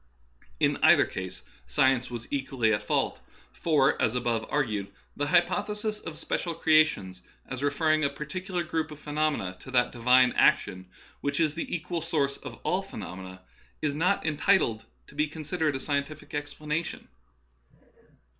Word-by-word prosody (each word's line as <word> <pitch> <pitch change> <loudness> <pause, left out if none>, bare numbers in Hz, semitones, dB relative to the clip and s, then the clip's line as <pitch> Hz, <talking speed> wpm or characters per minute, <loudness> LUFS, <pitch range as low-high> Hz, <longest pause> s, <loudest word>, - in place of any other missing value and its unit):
In - - +3
either - - +7
case 90 -10 -6 0.2
science 125 - +2
was 120 -1 -6
equally 130 -5 +1
at 105 - 0
fault; 105 - 0 0.3
for, 145 -5 +2
as 115 -1 +2
above 120 -2 0
argued, 105 -9 -1 0.2
the 145 - -1
hypothesis 210 +6 +1
of 160 -5 -8
special 170 -2 -2
creations, 155 - +3 0.2
as 130 -1 -6
re 145 - +3
ferring 155 +1 +2
a 140 - +3
particular 175 +5 -4
group 160 0 -2
of 150 -1 -10
phenomena 150 -11 -1
to - - -12
that 125 -1 +2
Divine 125 +1 +5
action 95 -2 +2 0.3
which 140 +1 -1
is 155 -3 +2
the 165 - -5
equal 175 0 -2
source 145 -4 0
of - - -9
all - - +1
phe - - -12
nomena, 95 +1 -8 0.4
is 145 -2 +1
not 180 +6 +1
entitled 150 - +2 0.2
to - - -17
be 150 +2 +1
considered 155 0 -2
a - - 0
scien 140 +1 0
tific 155 0 -12
explanation. 150 +2 -3
145 Hz, 155 wpm, -28 LUFS, 120-155 Hz, 0.4 s, either